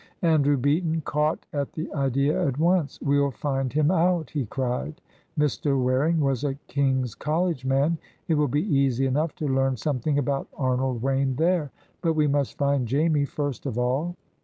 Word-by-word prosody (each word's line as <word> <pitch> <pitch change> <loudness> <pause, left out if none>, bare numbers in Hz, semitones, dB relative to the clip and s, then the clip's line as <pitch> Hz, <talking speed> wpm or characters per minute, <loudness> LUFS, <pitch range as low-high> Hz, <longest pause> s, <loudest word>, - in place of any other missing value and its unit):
Andrew 145 -4 +3
Beaton 160 +5 +1
caught 150 +1 -1
at 140 -2 -2
the 155 - -5
idea 140 +1 +1
at 135 -1 -2
once. 170 -1 +1
"We'll 140 0 +2
find 135 0 -2
him 150 +2 +2
out!" 175 -2 +1
he 140 -7 -2
cried. 130 - -3 0.4
"Mr. 145 -1 +1
Waring 130 +6 +2
was 135 -4 0
a 140 -2 -1
King's 130 -4 0
College 160 -2 -1
man. 140 +5 +2 0.3
It 165 - +2
will 150 -1 +2
be 145 +4 0
easy 135 - +2
enough 150 +4 0
to 150 - -3
learn 135 -1 +1
something 140 +3 -1
about 140 0 -1
Arnold 130 -2 0
Wayne 135 0 +1
there. 165 0 +1 0.3
But 165 -2 +1
we 155 -1 +2
must 140 -2 0
find 140 -3 +1
Jamie 145 +3 +2
first 145 -1 -4
of 125 -4 -3
all." 135 +8 0
140 Hz, 170 wpm, -25 LUFS, 135-155 Hz, 0.4 s, Andrew